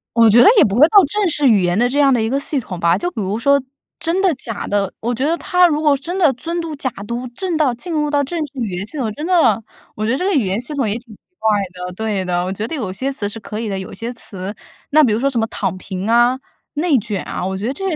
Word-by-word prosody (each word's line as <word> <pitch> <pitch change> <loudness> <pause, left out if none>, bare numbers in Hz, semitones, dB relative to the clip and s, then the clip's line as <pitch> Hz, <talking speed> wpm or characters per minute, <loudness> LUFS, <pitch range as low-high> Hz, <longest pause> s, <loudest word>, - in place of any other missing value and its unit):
我 230 -1 +6
觉 230 +3 +7
得 - - +7
也 385 - +8
不 200 -5 0
会 285 +6 +7
到 415 - +4
正 415 +5 0
式 295 -3 +2
语 215 -5 +5
言 175 +1 +1
的 240 +2 +3
这 275 +4 -1
样 275 -2 +5
的 240 - +2
一 220 - 0
个 270 +3 0
系 280 0 -1
统 185 -7 -7
吧， 170 +1 +3
就 350 - -2
比 225 - -4
如 195 +2 -2
说 280 +4 +3 0.4
真 335 +3 -1
的 380 -4 +3
假 225 -4 -5
的， 200 -1 0
我 240 +2 -2
觉 250 +3 -2
得 330 +3 +1
它 360 +1 +3
如 305 -2 0
果 295 -2 +4
真 335 +7 -5
的 325 -8 +4
“尊 335 +8 -4
嘟 325 -2 -4
假 275 -2 -1 0.2
嘟” 240 +2 -4
正 365 +4 -2
到 300 -5 +2
进 335 +9 -4
入 300 -1 0
到 290 -1 +1
正 335 +5 -4
式 - - -21
语 230 -4 -2
言 180 +1 -4
系 305 - -8
统， 235 -6 -1
真 300 +7 -6
的， 255 - +3 0.3
我 215 - -3
觉 225 - +1
得 260 - +1
这 360 - -2
个 395 - +1
语 270 - +2
言 190 +3 -1
系 250 +5 -7
统 270 -7 0
也 205 - 0
挺 235 -2 -13
奇 - - -18 0.2
怪 220 - +1 0.2
的 180 0 -6
对 205 -1 -2
的， 175 -1 0
我 185 - -3
觉 210 +3 -3
得 325 - -4
有 220 -10 -3
些 260 +9 -3
词 220 -7 -3
是 225 - -6
可 210 0 -6
以 225 -1 -3
的， 195 - -2
有 190 -1 -7
些 230 +1 -5
词 200 -4 -7 0.3
那 310 +1 +5
比 235 -6 +3
如 215 - 0
说 275 +3 +1
什 250 -4 -1
么 225 - +1
躺 185 - -3
平 190 +2 -5
啊、 240 +2 +4 0.3
内 305 -1 +2
卷 210 -4 -3
啊， - - -4
我 190 +1 -2
觉 200 +4 -3
得 260 - -1
这 385 +7 -4
些 350 - -1
240 Hz, 330 characters per minute, -18 LUFS, 210-295 Hz, 0.4 s, 也